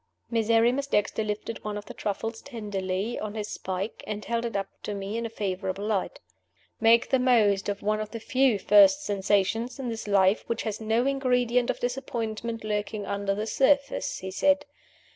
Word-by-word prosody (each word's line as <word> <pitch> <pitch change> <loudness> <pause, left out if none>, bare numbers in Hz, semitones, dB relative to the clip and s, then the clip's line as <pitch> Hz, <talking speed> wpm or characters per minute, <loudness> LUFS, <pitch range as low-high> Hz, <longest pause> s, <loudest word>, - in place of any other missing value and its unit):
Miserrimus 230 +4 +2
Dexter 210 -2 +1
lifted 210 +1 -4
one 210 -1 -3
of 205 - -7
the - - -9
truffles 225 +2 -4
tenderly 205 -3 -3
on 215 0 -5
his 210 -1 -3
spike, 190 +3 -4
and 210 0 -4
held 235 0 -1
it 230 - -4
up 195 -1 -1
to 205 - -4
me 200 +2 -4
in 230 0 -2
a - - -10
favorable 195 -2 -3
light. 220 - -1 0.6
"Make 230 +1 +4
the 265 - +4
most 215 -6 +3
of 200 0 -4
one 215 +1 +1
of 215 -1 -4
the 230 - -6
few 260 -2 +2
first 205 +7 +6
sensations 205 +3 0
in 260 -3 -4
this 225 -2 -5
life 195 0 +3
which 230 -1 -2
has 215 0 -4
no 225 +3 +1
ingredient 250 -3 +1
of - - -1
disappointment 230 -3 -3
lurking 210 -1 -2
under 200 0 -1
the 210 +2 -2
surface," 275 +4 +1
he 190 0 -6
said. 285 +7 +2
220 Hz, 180 wpm, -27 LUFS, 205-235 Hz, 0.6 s, first